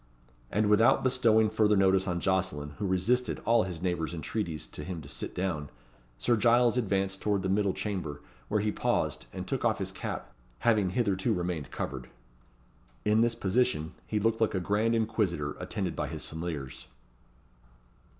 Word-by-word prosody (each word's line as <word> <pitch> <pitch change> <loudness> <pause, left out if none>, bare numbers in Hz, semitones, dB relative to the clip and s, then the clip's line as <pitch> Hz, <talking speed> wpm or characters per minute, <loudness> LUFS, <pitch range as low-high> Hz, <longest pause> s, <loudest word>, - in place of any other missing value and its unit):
And 105 +1 +1
without 105 +3 +5
bestowing 115 -4 +3
further 105 -1 +3
notice 95 0 +3
on 90 -1 0
Jocelyn, 90 -6 0
who 100 - -1
resisted 105 +8 +1
all 115 -3 +4
his 90 -2 -6
neighbour's 85 -2 -1
entreaties 85 -2 -3
to 75 - -9
him 90 +1 -5
to - - -11
sit - - -5
down, 85 -6 -2 0.5
Sir 120 - +2
Giles 120 +2 +4
advanced 95 -5 0
towards 100 -3 +1
the 95 - -1
middle 100 0 +2
chamber, 85 -9 -4 0.2
where 105 -1 +1
he 105 0 +1
paused, - - -1
and - - -5
took - - -2
off - - +2
his - - -3
cap, - - -6 0.3
having 110 -5 +3
hitherto 95 -2 +1
remained 85 -4 -3
covered. 65 -2 -5 1.0
In 105 +1 +4
this 115 0 +2
position, 100 -6 0
he 105 - 0
looked 115 +2 +1
like 110 - +2
a - - +1
grand 105 +5 +1
inquisitor 105 -10 0
attended - - -3
by - - -2
his - - -5
familiars. 80 -5 -6
95 Hz, 165 wpm, -29 LUFS, 85-110 Hz, 1.0 s, without